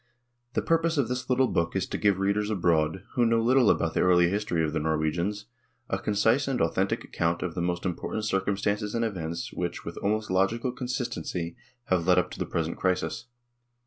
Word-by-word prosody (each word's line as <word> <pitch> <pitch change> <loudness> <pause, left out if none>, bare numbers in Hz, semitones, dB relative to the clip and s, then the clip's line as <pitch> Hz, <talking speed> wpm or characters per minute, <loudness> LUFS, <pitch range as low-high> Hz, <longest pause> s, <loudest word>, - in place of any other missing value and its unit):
The - - 0
purpose 165 0 +2
of 130 -5 +1
this 125 0 -3
little 130 +1 +4
book 85 -5 -1
is 95 -1 +1
to - - -2
give 100 -3 +3
readers 100 +2 0
abroad, 85 -3 +1
who 120 - +2
know 115 0 +3
little 125 0 +4
about 80 -1 +2
the - - 0
early 90 -1 +5
history 100 -5 0
of 75 - -3
the - - 0
Norwegians, 80 +7 -1 0.5
a 95 - 0
concise 110 +7 +2
and 135 -3 0
authentic 80 - 0
account 85 0 -1
of 90 -3 -3
the 85 - -3
most 90 +1 -2
important 100 +4 -3
circum 95 -1 0
stances 105 +1 -1
and 115 0 +1
events, 85 -6 -4
which, 85 -1 -4
with 85 - -6
almost 105 0 -1
logical 110 +7 +1
con 125 0 -6
sistency, 90 - -3 0.3
have 90 -5 0
led 90 -1 +5
up 90 0 +1
to - - -9
the - - -2
present 80 0 -2
crisis. 95 +6 -1
95 Hz, 205 wpm, -27 LUFS, 85-115 Hz, 0.5 s, early